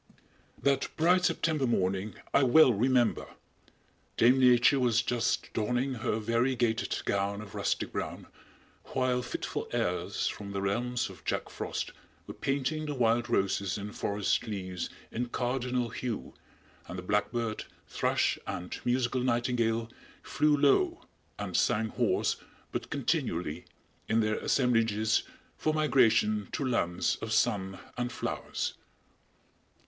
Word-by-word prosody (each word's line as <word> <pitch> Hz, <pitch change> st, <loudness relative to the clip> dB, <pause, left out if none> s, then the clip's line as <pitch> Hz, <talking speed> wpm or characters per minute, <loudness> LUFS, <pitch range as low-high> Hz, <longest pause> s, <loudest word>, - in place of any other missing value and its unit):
That 140 Hz, -1 st, +2 dB
bright 180 Hz, +3 st, +4 dB
September 155 Hz, -7 st, +1 dB
morning 95 Hz, -2 st, 0 dB, 0.2 s
I -, -, +5 dB
well 135 Hz, 0 st, +6 dB
remember! 120 Hz, +2 st, +1 dB, 0.8 s
Dame 125 Hz, +3 st, +5 dB
Nature 125 Hz, +2 st, +5 dB
was 115 Hz, -3 st, +3 dB
just 120 Hz, -1 st, -1 dB
donning 125 Hz, +5 st, 0 dB
her 115 Hz, -2 st, -1 dB
variegated 115 Hz, +1 st, 0 dB
gown 100 Hz, 0 st, 0 dB
of 105 Hz, -2 st, -9 dB
rustic -, -, -1 dB
brown, -, -, -4 dB, 0.7 s
while 130 Hz, -1 st, +1 dB
fitful 125 Hz, -, -4 dB
airs -, -, -1 dB
from 100 Hz, -1 st, -5 dB
the 100 Hz, -, -2 dB
realms 120 Hz, +5 st, -1 dB
of -, -, -15 dB
Jack -, -, -2 dB
Frost -, -, -4 dB, 0.3 s
were -, -, -7 dB
painting 140 Hz, +3 st, -1 dB
the 145 Hz, -, -3 dB
wild 120 Hz, -1 st, +2 dB
roses 100 Hz, -3 st, +1 dB
and 105 Hz, +1 st, -6 dB
forest 100 Hz, +1 st, 0 dB
leaves 95 Hz, -4 st, -4 dB, 0.2 s
in 120 Hz, +2 st, -2 dB
cardinal 125 Hz, 0 st, -1 dB
hue, 115 Hz, 0 st, -4 dB, 0.5 s
and 90 Hz, -, -6 dB
the 90 Hz, -, -5 dB
blackbird, 110 Hz, +3 st, -1 dB, 0.2 s
thrush -, -, +1 dB
and 90 Hz, 0 st, -5 dB
musical 125 Hz, +1 st, +1 dB
nightingale 120 Hz, -2 st, +1 dB, 0.4 s
flew 150 Hz, -1 st, +2 dB
low 140 Hz, -1 st, +3 dB, 0.3 s
and -, -, -4 dB
sang 110 Hz, +1 st, +2 dB
hoarse, -, -, +1 dB, 0.3 s
but -, -, -4 dB
continually, 80 Hz, -2 st, -1 dB, 0.4 s
in 110 Hz, -, +3 dB
their 110 Hz, 0 st, 0 dB
assemblages 115 Hz, -4 st, +2 dB, 0.3 s
for 155 Hz, 0 st, 0 dB
migration 110 Hz, -8 st, +3 dB
to 140 Hz, -, -1 dB
lands 95 Hz, -8 st, 0 dB
of 110 Hz, -, -6 dB
sun 100 Hz, -4 st, +1 dB, 0.2 s
and 125 Hz, 0 st, -1 dB
flowers. -, -, -3 dB
120 Hz, 125 wpm, -30 LUFS, 105-130 Hz, 0.8 s, well